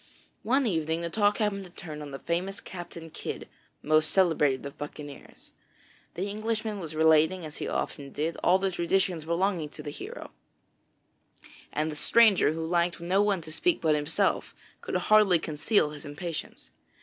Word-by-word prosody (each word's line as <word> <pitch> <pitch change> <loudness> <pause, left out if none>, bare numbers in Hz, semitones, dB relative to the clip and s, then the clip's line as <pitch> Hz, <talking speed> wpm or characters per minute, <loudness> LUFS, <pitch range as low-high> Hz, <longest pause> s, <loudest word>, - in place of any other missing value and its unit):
One 265 +4 +2
evening 160 -5 0
the 170 0 -3
talk 205 +1 +2
happened 210 -3 0
to - - -12
turn 160 -4 -8
on 145 - -7
the 135 - -6
famous 180 +6 -2
Captain 170 -3 -9
Kidd, - - -6 0.4
most 155 0 +3
celebrated 150 -8 +2
of 140 - -7
buccaneers. 145 -1 -9 0.6
The 185 +4 -2
Englishman 215 0 -2
was 160 -4 -6
relating, 160 +3 +4
as 150 - -8
he - - -4
often 140 -2 -3
did, 160 +3 -2
all 180 - +5
the 190 0 0
traditions 175 -1 0
belonging 170 -1 0
to 150 - -10
this 145 -1 -7
hero, - - -8 1.4
and 155 +1 -1
the - - -6
stranger 215 -1 +5
who 160 0 -3
liked 170 -1 +1
no 180 +4 +2
one 205 -3 +1
to 160 -1 -10
speak 350 - +1
but 160 -2 +2
himself, 150 0 0 0.3
could - - -4
hardly 210 -4 +5
conceal 155 +2 +1
his 150 -1 -10
impatience. 155 +3 -7
170 Hz, 165 wpm, -28 LUFS, 155-195 Hz, 1.4 s, all